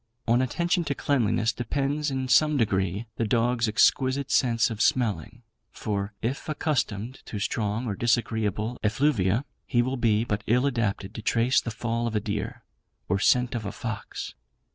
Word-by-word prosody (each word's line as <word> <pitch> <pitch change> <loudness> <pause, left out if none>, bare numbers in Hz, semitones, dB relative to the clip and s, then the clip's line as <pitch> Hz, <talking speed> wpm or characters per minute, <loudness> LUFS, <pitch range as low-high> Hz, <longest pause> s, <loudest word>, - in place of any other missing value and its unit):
On 120 +2 +4
attention 170 +7 0
to 140 - -1
cleanliness 115 -4 +1
depends, 140 +5 -1
in 130 -1 -2
some 150 +4 +4
degree, 100 -2 0
the 115 - 0
dog's 120 +1 +2
exquisite 130 +5 +2
sense 115 -3 +3
of 110 -1 -4
smelling; 115 - 0 0.3
for, 100 -1 -3
if 130 +6 -3
accustomed 130 -6 -2
to 105 - -5
strong 105 +2 -1
or 110 - -2
disagreeable 110 0 0
effluvia, 110 -1 +2 0.2
he 120 -3 +2
will 130 +2 -2
be 110 -2 +2
but 105 -2 -2
ill 125 +4 +3
adapted 115 -7 -1
to - - -6
trace 120 +4 +2
the - - -4
fall 115 +1 -2
of 115 - -3
a - - +3
deer, 105 0 -4 0.4
or 95 +2 +1
scent 125 +4 +3
of 120 -2 -3
a 100 - -4
fox. 110 -2 -6
115 Hz, 165 wpm, -26 LUFS, 105-130 Hz, 0.4 s, On